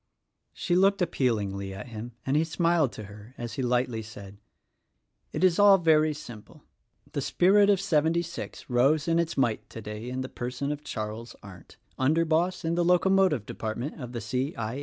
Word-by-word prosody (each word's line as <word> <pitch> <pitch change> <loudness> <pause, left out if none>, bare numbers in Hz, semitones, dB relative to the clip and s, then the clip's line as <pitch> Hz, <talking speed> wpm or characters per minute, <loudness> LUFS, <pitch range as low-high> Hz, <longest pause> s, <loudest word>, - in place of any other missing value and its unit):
She 175 - 0
looked 195 +1 +3
appealingly 100 - -1
at 105 +5 -8
him 115 +1 -7
and 135 - 0
he 155 - +3
smiled 165 -3 +1
to 110 - -8
her 105 +4 -13
as 120 -2 -6
he 135 - -3
lightly 125 -2 0
said, 100 -2 -11 0.9
"It 155 - -3
is 185 -1 +4
all 200 -1 +8
very 155 -3 +3
simple. 120 -8 -11 0.5
The - - -2
spirit 200 +3 +4
of 200 -2 +4
seventy 165 -2 +1
six 170 0 -8
rose 140 +6 +2
in 165 0 +2
its 170 0 -1
might 120 -5 0
today 105 +1 -7
in 130 +1 -3
the 130 - -4
person 125 +3 -4
of 150 0 -5
Charles 110 -1 -6
Arndt, 95 -4 -13 0.2
under 155 +6 +2
boss 170 +3 0
in 165 - 0
the 175 +1 +1
locomotive 180 - +3
department 120 +10 -5
of 125 -1 -6
the 120 -2 -5
C. 130 +7 -2
I. 115 +4 -3
135 Hz, 180 wpm, -27 LUFS, 115-170 Hz, 0.9 s, all